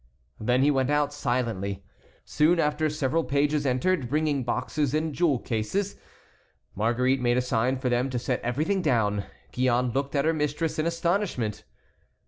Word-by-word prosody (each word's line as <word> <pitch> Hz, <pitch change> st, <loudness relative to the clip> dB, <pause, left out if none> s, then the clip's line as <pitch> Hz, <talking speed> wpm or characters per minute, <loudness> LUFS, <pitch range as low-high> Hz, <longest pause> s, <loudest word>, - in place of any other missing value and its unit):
Then 125 Hz, +4 st, +2 dB
he 145 Hz, -, +4 dB
went 135 Hz, -1 st, +1 dB
out 145 Hz, 0 st, +1 dB
silently. 115 Hz, -8 st, -2 dB, 0.4 s
Soon 165 Hz, +3 st, +2 dB
after 155 Hz, 0 st, +1 dB
several 155 Hz, +2 st, 0 dB
pages 145 Hz, 0 st, +1 dB
entered, 130 Hz, +1 st, +1 dB
bringing 150 Hz, -1 st, 0 dB
boxes 140 Hz, +4 st, -1 dB
and 155 Hz, 0 st, -1 dB
jewel 160 Hz, -4 st, +2 dB
caskets. 120 Hz, -, -2 dB, 0.8 s
Marguerite 125 Hz, +5 st, +1 dB
made 120 Hz, 0 st, +2 dB
a -, -, +4 dB
sign 125 Hz, +1 st, 0 dB
for 130 Hz, 0 st, -3 dB
them 125 Hz, +2 st, +1 dB
to 130 Hz, -, -2 dB
set 125 Hz, +1 st, -2 dB
everything 155 Hz, +11 st, 0 dB
down. 105 Hz, -, +1 dB, 0.3 s
Gillonne 125 Hz, -1 st, +1 dB
looked 140 Hz, +3 st, -2 dB
at 140 Hz, -, +2 dB
her 160 Hz, -, +3 dB
mistress 150 Hz, +1 st, -1 dB
in 155 Hz, -, +1 dB
astonishment. 170 Hz, -, -1 dB
135 Hz, 155 wpm, -26 LUFS, 120-155 Hz, 0.8 s, he